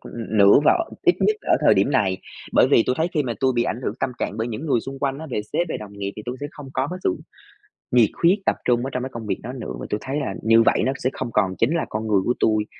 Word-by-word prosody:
ưm, 115 Hz, -1 st, -6 dB
nữa 100 Hz, 0 st, +7 dB
và 340 Hz, -2 st, +4 dB, 0.2 s
ít 355 Hz, -3 st, +4 dB
nhất 430 Hz, -, +3 dB
ở -, -, +2 dB
thời -, -, +6 dB
điểm -, -, +2 dB
này, 100 Hz, -9 st, +1 dB, 0.3 s
bởi -, -, +5 dB
vì -, -, +5 dB
tui 125 Hz, -, +1 dB
thấy 160 Hz, -, +1 dB
khi 150 Hz, -, +2 dB
mà 125 Hz, -4 st, -2 dB
tôi 130 Hz, -1 st, +3 dB
bị 120 Hz, -, +3 dB
ảnh 120 Hz, -, -3 dB
hưởng 105 Hz, -, -2 dB
tâm -, -, 0 dB
trạng 100 Hz, -, -3 dB
bởi 115 Hz, +2 st, -2 dB
những 120 Hz, +8 st, -5 dB
người 130 Hz, -6 st, +2 dB
xung 135 Hz, +2 st, -8 dB
quanh 135 Hz, -1 st, -1 dB
á, 160 Hz, -, -7 dB
về 115 Hz, -, -1 dB
sếp, 175 Hz, -, 0 dB
về -, -, -2 dB
đồng 105 Hz, -1 st, -9 dB
nghiệp 100 Hz, 0 st, -3 dB
thì 105 Hz, -, -7 dB
tui 125 Hz, +1 st, -4 dB
sẽ 145 Hz, -, -3 dB
không 145 Hz, -2 st, -11 dB
có 130 Hz, +1 st, 0 dB
cái 180 Hz, -, -5 dB
sự 90 Hz, -, +1 dB, 0.8 s
nhiệt 120 Hz, -4 st, +5 dB
huyết, 185 Hz, +5 st, +5 dB
tập -, -, +2 dB
trung 120 Hz, -1 st, +2 dB
ở -, -, -2 dB
trong 125 Hz, 0 st, -2 dB
cái 130 Hz, -, -4 dB
công 115 Hz, -1 st, -6 dB
việc -, -, -2 dB
đó 125 Hz, +3 st, -6 dB
nữa 125 Hz, -, -6 dB
và -, -, -6 dB
tui 105 Hz, -, 0 dB
thấy 135 Hz, +2 st, -3 dB
là 130 Hz, -9 st, -3 dB
như 115 Hz, +1 st, +5 dB
vậy -, -, +3 dB
nó 130 Hz, -, +2 dB
sẽ 130 Hz, -, +2 dB
không 125 Hz, -3 st, -5 dB
còn 95 Hz, -3 st, +1 dB
chính 135 Hz, +9 st, +2 dB
là 170 Hz, -, 0 dB
con 110 Hz, +1 st, -3 dB
người 100 Hz, -3 st, +3 dB
của 120 Hz, -, +2 dB
tui. 110 Hz, -1 st, +2 dB
125 Hz, 310 wpm, -22 LUFS, 110-140 Hz, 0.8 s, nữa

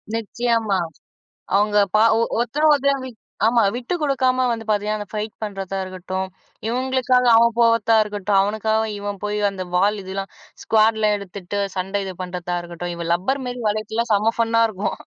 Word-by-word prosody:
நிச்சயமா. 230 Hz, -2 st, 0 dB, 0.8 s
அவுங்க 210 Hz, +1 st, +2 dB, 0.2 s
ப -, -, +6 dB, 0.2 s
ஒ -, -, +2 dB, 0.2 s
ஒருத்தர் 280 Hz, +6 st, +1 dB
ஒருத்தர் 280 Hz, -1 st, +2 dB
வி -, -, -6 dB, 0.4 s
ஆமா. 230 Hz, +1 st, +4 dB
விட்டு 250 Hz, +8 st, -3 dB
குடுக்காம 260 Hz, -3 st, +2 dB
வந்து 225 Hz, -1 st, -4 dB
பாத்தீங்கன்னா, 210 Hz, 0 st, 0 dB
அந்த 205 Hz, -, -6 dB
ஃபைட் 215 Hz, 0 st, -3 dB
பண்ணுறதா 195 Hz, -2 st, -4 dB
இருக்கட்டும், 185 Hz, 0 st, -4 dB, 0.4 s
இவங்களுக்காக 255 Hz, 0 st, +1 dB
அவன் 235 Hz, 0 st, +5 dB
போவறத்தா 230 Hz, -1 st, +4 dB
இருக்கட்டும், 205 Hz, -1 st, 0 dB
அவனுக்காக 220 Hz, +2 st, 0 dB, 0.2 s
இவன் 205 Hz, -1 st, -5 dB
போய் 210 Hz, 0 st, -1 dB
அந்த 185 Hz, -1 st, -5 dB
வால் 205 Hz, +3 st, +2 dB
இதுலாம் 195 Hz, +1 st, -5 dB, 0.3 s
ஸ்குவாட்ல 220 Hz, -1 st, +3 dB
எடுத்துட்டு 200 Hz, 0 st, -6 dB, 0.2 s
சண்ட 195 Hz, +2 st, -2 dB
இது 190 Hz, -, -5 dB
பண்ணுறதா 180 Hz, -1 st, -4 dB
இருக்கட்டும், 175 Hz, 0 st, -6 dB
இவன் 170 Hz, 0 st, -3 dB
லப்பர் 265 Hz, +11 st, -1 dB
மாரி 245 Hz, 0 st, -5 dB
வளைச்சுல்லாம் 220 Hz, +2 st, -2 dB
செம்ம 215 Hz, +3 st, +2 dB
ஃபன்னா 230 Hz, 0 st, +2 dB
இருக்கும். 200 Hz, 0 st, -3 dB
215 Hz, 155 wpm, -21 LUFS, 195-235 Hz, 0.8 s, ப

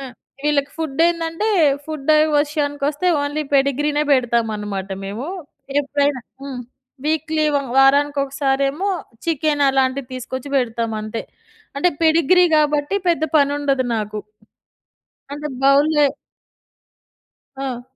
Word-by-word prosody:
ఆ! 275 Hz, -, -6 dB, 0.4 s
వీళ్ళకి 285 Hz, -1 st, +1 dB
ఫుడ్ 315 Hz, -3 st, -3 dB
ఏందంటే 335 Hz, +4 st, -1 dB, 0.4 s
ఫుడ్ 310 Hz, -1 st, -2 dB, 0.3 s
విషయానికి 290 Hz, -1 st, -1 dB
వస్తే 300 Hz, +5 st, -2 dB, 0.2 s
ఓన్లీ 290 Hz, +2 st, -2 dB
పెడిగ్రీనే 290 Hz, +2 st, +2 dB
పెడతామనమాట 215 Hz, -6 st, 0 dB, 0.2 s
మేము. 210 Hz, +8 st, -5 dB, 0.5 s
ఎప్పుడైనా 285 Hz, -1 st, 0 dB, 0.2 s
హ్మ్. 265 Hz, -3 st, -6 dB, 0.5 s
వీక్‌లీ 315 Hz, 0 st, 0 dB, 0.3 s
వారానికి 285 Hz, +2 st, +4 dB
ఒకసారేమో 275 Hz, +5 st, -1 dB, 0.4 s
చికెన్ 310 Hz, -2 st, 0 dB
అలాంటివి 265 Hz, -1 st, 0 dB
తీసుకొచ్చి 260 Hz, +2 st, -6 dB
పెడతాము 230 Hz, -3 st, -1 dB
అంతే. 215 Hz, +1 st, -5 dB, 0.5 s
అంటే 290 Hz, +6 st, +3 dB
పెడిగ్రీ 330 Hz, +2 st, +4 dB
కాబట్టి 295 Hz, +2 st, +1 dB
పెద్ద 335 Hz, -2 st, +1 dB, 0.2 s
పనుండదు 280 Hz, -2 st, +1 dB
నాకు. 210 Hz, 0 st, -4 dB, 1.1 s
అంటే 295 Hz, +1 st, -5 dB, 0.2 s
బౌల్‌లో 290 Hz, +2 st, +4 dB, 1.5 s
ఆ! 265 Hz, -3 st, -4 dB
285 Hz, 100 wpm, -20 LUFS, 260-300 Hz, 1.5 s, వారానికి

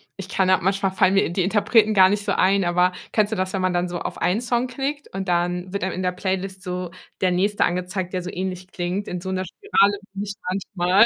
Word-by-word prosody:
Ich 195 Hz, -1 st, -8 dB
kann 190 Hz, -1 st, +2 dB
halt 185 Hz, -, +4 dB
manchmal 195 Hz, +1 st, +1 dB
fallen 190 Hz, 0 st, +3 dB
mir 195 Hz, -, +5 dB
die 170 Hz, -, -4 dB
die 185 Hz, -, +1 dB
Interpreten 215 Hz, +2 st, +3 dB
gar 190 Hz, -1 st, +8 dB
nicht 205 Hz, +1 st, 0 dB
so 205 Hz, -, -1 dB
ein, 195 Hz, +1 st, +3 dB
aber 180 Hz, +1 st, +3 dB, 0.2 s
kennst 215 Hz, -1 st, +2 dB
du -, -, 0 dB
das, 185 Hz, -1 st, -2 dB
wenn 190 Hz, -1 st, -1 dB
man 185 Hz, -1 st, +1 dB
dann 175 Hz, 0 st, 0 dB
so 175 Hz, 0 st, -3 dB
auf -, -, -5 dB
einen 195 Hz, +6 st, +1 dB
Song 245 Hz, 0 st, 0 dB
klickt 275 Hz, +3 st, -4 dB
und 195 Hz, 0 st, -3 dB
dann 180 Hz, +1 st, 0 dB
wird 200 Hz, -, -2 dB
einem 190 Hz, -, -1 dB
in 185 Hz, -, -3 dB
der 180 Hz, -, +1 dB
Playlist 190 Hz, +1 st, -3 dB
so 180 Hz, -2 st, -4 dB, 0.3 s
der 185 Hz, -1 st, +2 dB
nächste 200 Hz, +3 st, +2 dB
angezeigt, 180 Hz, +1 st, -2 dB
der 185 Hz, -, -1 dB
so 180 Hz, -, -6 dB
ähnlich 185 Hz, 0 st, -4 dB
klingt 185 Hz, +2 st, -3 dB
in 180 Hz, -1 st, -4 dB
so 190 Hz, -, -5 dB
'ner 185 Hz, 0 st, -1 dB
Spirale, 205 Hz, -, +2 dB
finde 195 Hz, +1 st, -4 dB
ich 200 Hz, -, -5 dB, 0.4 s
manchmal. 185 Hz, +4 st, +5 dB
190 Hz, 255 wpm, -23 LUFS, 180-200 Hz, 0.4 s, gar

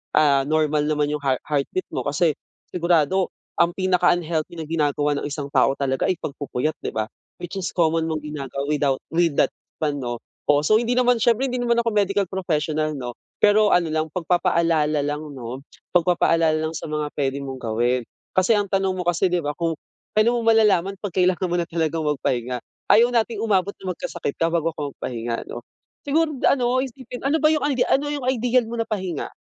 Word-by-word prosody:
ah, 140 Hz, -3 st, +4 dB
normal 155 Hz, -1 st, +2 dB
naman 150 Hz, -1 st, +1 dB
'yung 150 Hz, -1 st, -3 dB
heart 130 Hz, -2 st, +1 dB
heartbeat 150 Hz, +5 st, -1 dB
mo, -, -, -2 dB
kasi 150 Hz, +1 st, +1 dB, 0.3 s
sigurado 175 Hz, +1 st, +1 dB, 0.3 s
ang 170 Hz, 0 st, +4 dB
pinaka 185 Hz, -2 st, +3 dB
unhealthy 170 Hz, -1 st, -2 dB
na 160 Hz, -, -5 dB
ginagawa 150 Hz, -2 st, +1 dB
ng -, -, -3 dB
isang 145 Hz, -1 st, -4 dB
tao 135 Hz, -, +3 dB
talaga 135 Hz, -1 st, 0 dB
ay 185 Hz, -, +1 dB
pagpupuyat 145 Hz, 0 st, -3 dB
'di -, -, -2 dB
ba. 110 Hz, -1 st, -1 dB, 0.3 s
Which 175 Hz, +2 st, -6 dB
is 190 Hz, -, -3 dB
common 165 Hz, -1 st, +2 dB
mong 155 Hz, -, -2 dB
ginagawa 140 Hz, -2 st, -5 dB
without 145 Hz, -3 st, +1 dB
with 170 Hz, -1 st, +2 dB
that -, -, +2 dB, 0.3 s
one 150 Hz, -2 st, 0 dB
'no. 120 Hz, -1 st, -3 dB, 0.3 s
Um, 145 Hz, -, +4 dB
so 150 Hz, +9 st, +3 dB
hindi 235 Hz, +2 st, +2 dB
naman 245 Hz, -2 st, +3 dB
siyempre 240 Hz, +3 st, +3 dB
hindi 250 Hz, -, -3 dB
naman 235 Hz, -1 st, +2 dB
ako 235 Hz, 0 st, +1 dB
medical 200 Hz, -1 st, +2 dB
professional 155 Hz, -4 st, -1 dB
'no, 120 Hz, -1 st, -6 dB, 0.2 s
pero 210 Hz, 0 st, +5 dB
ano 175 Hz, -2 st, +3 dB
lang 155 Hz, 0 st, -1 dB
pagpapaalala 170 Hz, -4 st, +1 dB
lang 150 Hz, +1 st, -2 dB
'no, 130 Hz, 0 st, -7 dB, 0.3 s
pagpapaalala 165 Hz, -2 st, +3 dB
lang 160 Hz, +1 st, -3 dB
sa -, -, -5 dB
mga 150 Hz, -1 st, -1 dB
puwede 140 Hz, -1 st, -1 dB
mong 135 Hz, -2 st, -6 dB
gawin. 120 Hz, +3 st, +1 dB, 0.3 s
Kasi 185 Hz, +3 st, +3 dB
ang 205 Hz, -1 st, 0 dB
tanong 195 Hz, 0 st, +1 dB
mo -, -, -1 dB
kasi 175 Hz, +1 st, +2 dB
'di 180 Hz, -, +2 dB
ba, 145 Hz, -2 st, -3 dB
kung 170 Hz, -1 st, -1 dB, 0.5 s
kailan 235 Hz, +3 st, +4 dB
mo 235 Hz, -, 0 dB
malalaman 200 Hz, -4 st, +3 dB
'pag 205 Hz, -4 st, -6 dB
kailangan 185 Hz, 0 st, +2 dB
mo 175 Hz, -, -1 dB
na 175 Hz, -, +1 dB
talagang 165 Hz, -1 st, -1 dB
magpahinga. 125 Hz, -4 st, -1 dB, 0.3 s
Ayaw 230 Hz, +3 st, +7 dB
nating 230 Hz, -1 st, +1 dB
umabot 200 Hz, -3 st, +1 dB
na 185 Hz, -2 st, -4 dB
magkasakit 140 Hz, -, -4 dB
ka 165 Hz, 0 st, 0 dB
bago 165 Hz, -1 st, 0 dB
ka 150 Hz, -, -4 dB
magpahinga 115 Hz, -2 st, -4 dB
'no. 120 Hz, -, -7 dB, 0.4 s
Siguro 305 Hz, +1 st, +1 dB
ano 255 Hz, -1 st, +3 dB
isipin 255 Hz, -1 st, -8 dB
ano 290 Hz, +4 st, +2 dB
ba 310 Hz, -, +4 dB
'yung 310 Hz, -1 st, +2 dB
ano 290 Hz, -, +1 dB, 0.2 s
ano 280 Hz, +2 st, +2 dB
'yung 285 Hz, -3 st, -3 dB
ideal 250 Hz, -1 st, +2 dB
mo 235 Hz, -, -5 dB
na 230 Hz, -, 0 dB
pahinga? 190 Hz, -8 st, -4 dB
165 Hz, 195 wpm, -23 LUFS, 150-200 Hz, 0.5 s, Ayaw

